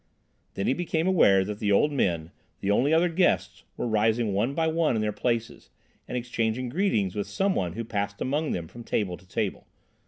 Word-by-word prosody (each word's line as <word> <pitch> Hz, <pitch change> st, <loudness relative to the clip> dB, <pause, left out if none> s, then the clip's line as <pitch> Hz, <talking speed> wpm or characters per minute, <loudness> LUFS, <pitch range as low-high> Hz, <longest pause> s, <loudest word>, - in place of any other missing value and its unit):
Then 100 Hz, -, -2 dB
he -, -, +3 dB
became 165 Hz, 0 st, -1 dB
aware 100 Hz, -, +5 dB
that 105 Hz, +1 st, -5 dB
the 105 Hz, -1 st, 0 dB
old 150 Hz, +9 st, +4 dB
men, 85 Hz, -, 0 dB, 0.3 s
the 100 Hz, -, 0 dB
only 130 Hz, +8 st, +3 dB
other 165 Hz, +2 st, +4 dB
guests, 95 Hz, -, 0 dB
were -, -, -2 dB
rising 110 Hz, 0 st, +1 dB
one 115 Hz, +8 st, 0 dB
by 165 Hz, -, +1 dB
one 160 Hz, -4 st, +1 dB
in 110 Hz, -, 0 dB
their 105 Hz, -, 0 dB
places, 115 Hz, 0 st, -2 dB, 0.4 s
and 125 Hz, -, -3 dB
exchanging 120 Hz, 0 st, -2 dB
greetings 120 Hz, -, +1 dB
with 100 Hz, +1 st, -3 dB
some 195 Hz, 0 st, 0 dB
one 90 Hz, -, -1 dB
who 115 Hz, -, -4 dB
passed 100 Hz, -2 st, -3 dB
among 145 Hz, +3 st, -1 dB
them 85 Hz, -2 st, -3 dB
from 120 Hz, +7 st, -11 dB
table 100 Hz, -5 st, -1 dB
to 90 Hz, -, -19 dB
table. -, -, -3 dB
115 Hz, 205 wpm, -27 LUFS, 100-150 Hz, 0.4 s, aware